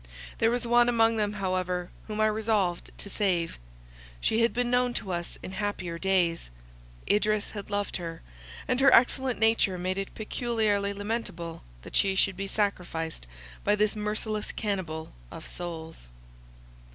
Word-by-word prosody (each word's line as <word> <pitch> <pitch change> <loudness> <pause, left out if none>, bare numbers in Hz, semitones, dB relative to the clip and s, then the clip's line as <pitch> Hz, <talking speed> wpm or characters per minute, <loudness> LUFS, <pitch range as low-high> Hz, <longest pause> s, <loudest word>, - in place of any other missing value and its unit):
There 225 - +4
was 245 +1 0
one 240 0 +5
among 225 -1 +4
them 210 -1 +1
however 185 -3 -1 0.2
whom 215 0 -2
I - - +5
resolved 215 -4 +1
to - - -5
save; 180 - 0 0.6
she 220 - +2
had 230 - +4
been 245 0 0
known 245 -1 +2
to 190 - -3
us 175 -1 -3
in - - -6
happier 190 -4 -3
days; 180 - +1 0.6
Idris 210 0 +2
had 205 -1 -7
loved 205 -1 -1
her; 165 -2 -6 0.4
and 250 - +1
her 270 0 +7
excellent 255 +1 +3
nature 220 -4 +3
made 185 +2 -1
it 195 - -5
peculiarly 215 -3 0
lamentable 200 -5 -4 0.2
that - - -8
she 195 -1 +4
should 190 0 +2
be 195 +1 -3
sacrificed 175 - -2 0.4
by 205 - +4
this 210 +1 +2
merciless 210 0 -2
cannibal 180 -7 -3 0.2
of - - -9
souls. 165 - -7
205 Hz, 150 wpm, -28 LUFS, 180-220 Hz, 0.6 s, her